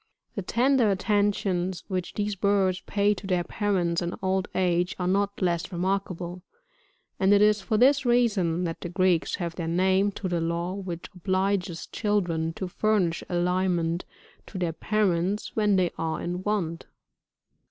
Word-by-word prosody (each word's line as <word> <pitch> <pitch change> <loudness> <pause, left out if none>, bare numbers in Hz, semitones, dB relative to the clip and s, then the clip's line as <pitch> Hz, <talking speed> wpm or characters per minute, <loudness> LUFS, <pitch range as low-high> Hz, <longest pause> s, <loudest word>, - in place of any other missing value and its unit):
The 200 - -3
tender 245 +3 +2
attentions 195 -3 0
which 185 -2 -3
these 205 -1 -1
birds 195 -1 +1
pay 205 0 +2
to 195 -1 -8
their 180 -2 +1
parents 180 -3 0
in 170 - -1
crfd 190 0 -1
age, 180 -1 +1
are 180 - -2
not 200 +2 0
less 170 -1 0
remarkable, 180 -1 -2 0.8
and 190 +1 +3
it - - +5
is 210 0 +4
for 215 +2 0
this 270 +4 +5
reason 215 -9 +2
that 165 -2 -4
the 175 - -4
Greeks 180 -2 +1
gave 175 -3 -4
their 170 -1 -4
name 190 +4 +2
to 190 - -4
the 175 -2 -1
law 170 +2 -1
which 185 -4 -6
obliges 185 -1 -1
children 175 -7 -1
to 185 - -4
furnish 185 -3 0
aliment 175 -1 0 0.4
to 195 - -8
their 175 -3 -1
parents 195 +1 0
when 210 -2 +3
they 180 -2 +2
are 160 -1 -1
in 180 +1 -3
want. 185 -5 -2
185 Hz, 155 wpm, -26 LUFS, 175-205 Hz, 0.8 s, it